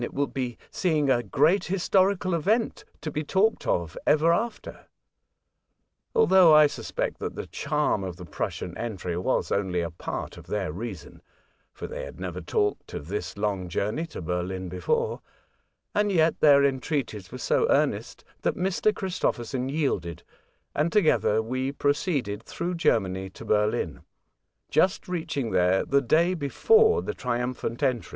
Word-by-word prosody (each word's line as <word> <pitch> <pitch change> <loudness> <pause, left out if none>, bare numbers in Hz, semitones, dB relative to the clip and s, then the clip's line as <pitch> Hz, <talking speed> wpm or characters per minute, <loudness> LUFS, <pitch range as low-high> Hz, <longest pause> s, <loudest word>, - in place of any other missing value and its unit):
It - - -5
will 145 - +2
be 125 -4 -4
seeing 155 -6 +1
a 120 - +3
great 150 - +2
historical 185 0 +2
event, 210 +8 0 0.2
to 155 - -4
be 150 +2 -2
talked 195 +8 +1
of 85 -2 0
ever 160 +2 +4
after." 230 +6 -4 1.3
Although 190 - +6
I 150 0 +8
suspect 145 - -3
that - - -4
the - - -5
charm 95 - -1
of 90 -3 -5
the 90 0 -10
Prussian 85 +2 -4
entry 95 -7 -3
was 90 - 0
only 95 -3 0
a 85 0 -3
part 85 - -6
of - - -13
their 100 -5 -2
reason 95 -1 -7 0.5
(for - - -8
they - - -6
had - - -9
never 90 -1 -5
talked 105 +4 -1
of 75 - -7
this 105 +1 -4
long 100 -3 -2
journey 105 - -2
to 125 - -8
Berlin 90 +2 -3
before), 90 -1 -1 0.8
yet 170 -6 +2
their 140 -2 +6
entreaties 130 - -2
were - - -6
so - - +1
earnest - - 0 0.2
that - - 0
Mr. 190 +3 +1
Christopherson 130 - -2
yielded, 115 - -2 0.5
and 155 +3 +1
together 150 - +3
we 130 +4 -2
proceeded 145 - -1
through 170 +9 -4
Germany 95 - 0
to - - -12
Berlin, 105 0 0 0.7
just 180 +5 +2
reaching 160 -9 -2
there 90 +1 +3
the 140 +1 +3
day 165 +7 +3
before 440 - +3
the 430 - -3
triumphant 120 - -3
entry. 125 -4 0
130 Hz, 150 wpm, -26 LUFS, -, 1.3 s, I